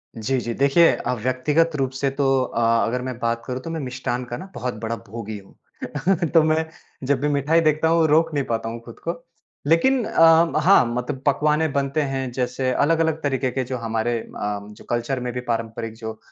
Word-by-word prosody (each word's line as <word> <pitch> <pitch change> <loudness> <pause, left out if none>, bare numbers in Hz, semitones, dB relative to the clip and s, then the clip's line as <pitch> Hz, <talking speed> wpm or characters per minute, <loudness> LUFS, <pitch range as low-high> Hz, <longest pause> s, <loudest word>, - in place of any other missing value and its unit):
जी, 125 +4 -1
जी। 120 -1 -3
देखिए, 140 +7 +5
अ, - - -2
व्यक्तिगत 150 +6 +1
रूप 135 -2 -1
से 135 +1 0
तो 140 0 -1 0.2
अ, 120 -1 -3 0.3
अगर 125 +2 -2
मैं 130 -1 -5
बात 115 0 -1
करूँ 125 0 -4
तो 165 - -7
मैं 165 - -3
मिष्ठान 125 -2 -3
का 120 0 -5
ना 190 - -9
बहुत 125 +1 -3
बड़ा 115 +1 -1
भोगी 110 0 -6
हूँ। 145 - -3
तो 165 - +7
मैं 160 +1 +2 0.4
जब 140 -2 +2
भी 150 - +1
मिठाई 145 +4 +2
देखता 155 0 +2
हूँ 165 -1 +3
रोक 160 +1 +3
नहीं 140 -2 0
पाता 115 -1 -2
हूँ 115 - -6
खुद 115 - -12
को, 170 - +1 0.5
लेकिन 245 - +3
अ, 165 -1 +5
हाँ 185 -5 +6
मतलब 130 +2 -3
पकवान 150 +2 +2
बनते 140 +1 -1
हैं 135 -3 -2
जैसे 125 +1 -1
अलग-अलग 160 +2 +1
तरीके 135 -2 0
के 130 +1 -1
जो 130 +1 -4
हमारे 115 0 -1
अ, 105 -2 -4
जो - - -14
कल्चर 120 +2 -1
में 125 0 -3
भी 125 - -3
पारंपरिक 115 -1 -3
जो 110 -1 -6
अ, - - -21
135 Hz, 205 wpm, -22 LUFS, 120-155 Hz, 0.5 s, तो